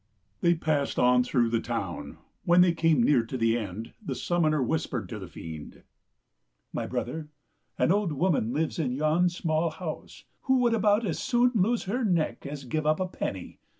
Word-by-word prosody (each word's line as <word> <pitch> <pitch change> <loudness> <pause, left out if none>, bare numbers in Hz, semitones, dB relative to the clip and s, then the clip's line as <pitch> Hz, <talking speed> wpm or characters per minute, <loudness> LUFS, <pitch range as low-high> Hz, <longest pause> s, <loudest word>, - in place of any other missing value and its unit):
They 170 0 +3
passed 155 -3 -1
on 125 0 +4
through 120 -2 +1
the 115 - +2
town. 115 -7 -4 0.3
When 175 +1 +5
they 180 -1 +5
came 165 -6 +3
near 125 -2 +4
to 130 +3 -5
the 115 -1 +2
end, 110 -1 -5
the - - -3
summoner 160 -3 +1
whispered 155 +6 -2
to 110 - -6
the 95 - -8
fiend, 80 -3 -9 0.4
" - - -51
My - - -3
brother, 155 -2 -4 0.5
an - - +3
old 200 -3 +1
woman 145 -6 +1
lives 155 +5 -1
in 130 -6 0
yon 155 +5 +2
small 165 -2 0
house 160 0 -7 0.2
who 265 -1 +4
would 240 -2 +3
about 215 0 +3
as 170 - -2
soon 245 -1 +2
lose 225 +3 +1
her 240 +7 -2
neck 170 -8 0
as 140 -1 -6
give 150 +5 -2
up 155 0 +2
a 185 - 0
penny. 95 - -5
155 Hz, 185 wpm, -27 LUFS, 120-180 Hz, 0.5 s, When